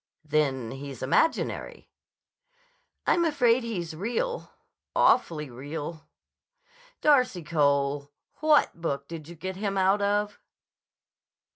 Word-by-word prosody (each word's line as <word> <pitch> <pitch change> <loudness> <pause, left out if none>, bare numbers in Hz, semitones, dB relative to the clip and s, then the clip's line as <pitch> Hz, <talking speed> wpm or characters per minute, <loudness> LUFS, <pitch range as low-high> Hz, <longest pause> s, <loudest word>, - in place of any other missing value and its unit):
"Then 140 -6 0
he's 135 -2 -7
imaginary." 320 - 0 1.1
"I'm 345 - +3
afraid 255 -7 +3
he's 175 -9 -4
real. 245 - -2 0.5
Awfully 160 -11 +3
real." 145 +5 -7 0.9
"Darcy 250 - +3
Cole; 140 -3 +1 0.3
what 300 - +3
book 140 -4 -2
did 160 -3 -8
you 170 - -10
get 185 +3 -5
him 200 -1 -2
out 190 +2 +3
of?" 205 +1 0
170 Hz, 100 wpm, -27 LUFS, 145-220 Hz, 1.1 s, I'm